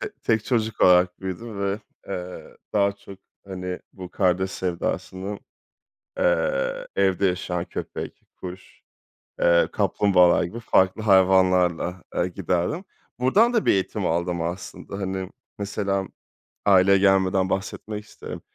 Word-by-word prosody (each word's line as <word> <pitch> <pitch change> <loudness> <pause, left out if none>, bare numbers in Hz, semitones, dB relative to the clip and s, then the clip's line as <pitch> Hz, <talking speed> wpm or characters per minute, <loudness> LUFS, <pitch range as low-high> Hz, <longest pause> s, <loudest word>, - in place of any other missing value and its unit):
T - - -4
tek 110 -2 +1
çocuk 110 -3 -1
olarak 90 0 +5
büyüdüm 100 +3 -6
ve, 100 +1 -1 0.3
eee, 90 -2 -7 0.2
daha 100 -1 +3
çok, 100 -1 -13 0.3
hani, 90 -1 -5
bu 90 -2 -9
kardeş 95 0 +1
sevdasını, 95 +2 -3 0.8
eee, - - 0
evde 95 +1 +2
yaşayan 90 -1 -1
köpek, - - -6
kuş, 90 +1 -10 0.6
eee, 85 0 +4
kaplumbağalar 90 -4 +3
gibi 90 +7 -5
farklı 95 -2 +2
hayvanlarla, 95 -3 +3
eee, 90 - +1
giderdim. 90 - -2 0.3
Buradan 205 - +4
da 225 - +1
bir - - +6
eğitim 95 -1 -1
aldım 85 +1 -1
aslında. 90 +3 -6
Hani, 95 -1 -3 0.3
mesela 100 -1 -2 0.6
aileye 100 0 +6
gelmeden 95 -1 +3
bahsetmek 105 +2 -4
isterim. - - -9
95 Hz, 120 wpm, -24 LUFS, 90-100 Hz, 0.8 s, bir